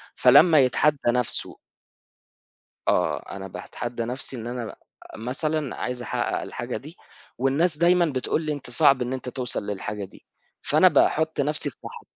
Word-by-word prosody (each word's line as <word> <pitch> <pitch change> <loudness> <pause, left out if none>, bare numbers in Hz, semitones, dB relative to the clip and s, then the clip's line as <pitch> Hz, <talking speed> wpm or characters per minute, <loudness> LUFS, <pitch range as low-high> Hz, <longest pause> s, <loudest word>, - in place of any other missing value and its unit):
فلمّا 145 +5 +6
يتحدّى 140 +3 +3
نَفْسه 125 -1 -2 1.3
آه، - - +1
أنا 95 0 -7
باتحدّى 120 +5 -6
نَفْسي 130 +2 -4
إن 115 +1 -6
أنا 120 -3 -5 0.4
مثلًا 140 +5 -2
عايز 125 0 -4
أحقّق 120 - -2
الحاجة - - -5
دي، - - -12 0.4
والناس 145 +6 +2
دايمًا 175 +2 +4
بتقول 140 0 -1
لي: 155 -1 -1
"أنت 145 -4 -8
صعب 135 +1 +4
إن 125 +1 -2
أنت 130 -1 -5
توصل 125 -5 -3
للحاجة 105 0 -4
دي." 95 - -18 0.4
فأنا - - +4
باحُط 160 -1 +2
نَفْسي 150 +1 0
في - - -16
مح - - -9
130 Hz, 150 wpm, -24 LUFS, 120-150 Hz, 1.3 s, فلمّا